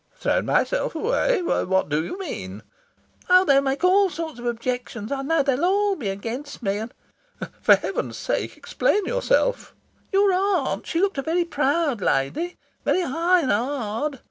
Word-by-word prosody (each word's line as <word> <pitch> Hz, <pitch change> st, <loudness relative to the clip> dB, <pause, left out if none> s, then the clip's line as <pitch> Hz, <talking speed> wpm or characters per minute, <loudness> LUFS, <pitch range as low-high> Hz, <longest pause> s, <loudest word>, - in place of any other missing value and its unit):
"Thrown -, -, 0 dB
myself -, -, +1 dB
away? 470 Hz, +2 st, +1 dB
What 190 Hz, -, +1 dB
do 150 Hz, +2 st, 0 dB
you 265 Hz, -, -6 dB
mean?" 105 Hz, -, -6 dB, 0.7 s
"Oh, 365 Hz, +1 st, +6 dB
they'll 275 Hz, -4 st, +5 dB
make 275 Hz, +3 st, -2 dB
all 385 Hz, +2 st, +5 dB
sorts 320 Hz, -4 st, -6 dB
of 240 Hz, -, -5 dB
objections, 240 Hz, -1 st, -3 dB
I 275 Hz, -1 st, -1 dB
know. 305 Hz, +2 st, +1 dB
They'll 275 Hz, +2 st, 0 dB
all 400 Hz, +2 st, +2 dB
be 235 Hz, -, -4 dB
against 235 Hz, +8 st, -6 dB
me, 200 Hz, 0 st, 0 dB
and 225 Hz, +2 st, -6 dB, 0.4 s
" -, -, -11 dB
"For -, -, +7 dB
heaven's -, -, -4 dB
sake, -, -, -3 dB
explain 415 Hz, -1 st, 0 dB
yourself." -, -, 0 dB, 0.4 s
"Your 395 Hz, -1 st, +4 dB
aunt, 385 Hz, +1 st, 0 dB
she 335 Hz, -, -1 dB
looked 385 Hz, -6 st, +1 dB
a -, -, +1 dB
very 335 Hz, +4 st, 0 dB
proud 290 Hz, -, 0 dB
lady 185 Hz, -, -1 dB, 0.3 s
very 370 Hz, -, +2 dB
high 345 Hz, +4 st, +2 dB
and 265 Hz, -, 0 dB
hard. 250 Hz, +3 st, -2 dB
295 Hz, 170 wpm, -23 LUFS, 240-370 Hz, 0.7 s, For